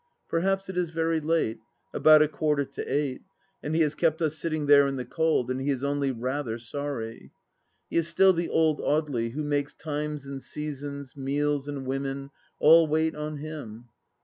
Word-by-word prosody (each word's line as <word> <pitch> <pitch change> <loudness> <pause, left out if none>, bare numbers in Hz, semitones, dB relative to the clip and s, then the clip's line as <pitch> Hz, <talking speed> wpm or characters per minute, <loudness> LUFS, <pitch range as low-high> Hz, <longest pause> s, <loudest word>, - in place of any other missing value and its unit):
Perhaps 195 +3 0
it 190 - -6
is 175 -2 0
very 165 0 0
late 155 -7 0 0.2
— - - -45
about 155 -1 +7
a - - +1
quarter 150 -2 0
to - - -7
eight 140 -2 -1 0.2
— 195 - -42
and 150 +2 -2
he 165 - +3
has 150 -2 +2
kept 160 0 +1
us 155 -2 0
sitting 155 -1 -2
there 140 -1 +6
in 135 - -2
the 125 -1 -4
cold, 160 -3 +1
and 130 +1 -2
he 140 - -1
is 135 -1 -1
only 140 -1 0
rather 125 0 -3
sorry. 115 -1 -6 0.6
He - - -2
is 165 -1 +2
still 190 +3 +5
the 170 -1 -2
old 160 -2 +2
Audely 140 -7 0
who 150 +2 -3
makes 145 -1 -1
times 150 -1 -4
and 135 -1 -6
seasons, 140 -2 -6
meals 145 +1 -1
and 140 -2 -5
women, 135 +1 -3 0.3
all 165 +1 +7
wait 160 +1 +1
on 150 0 -5
him. 140 -7 -8
145 Hz, 195 wpm, -27 LUFS, 135-160 Hz, 0.6 s, about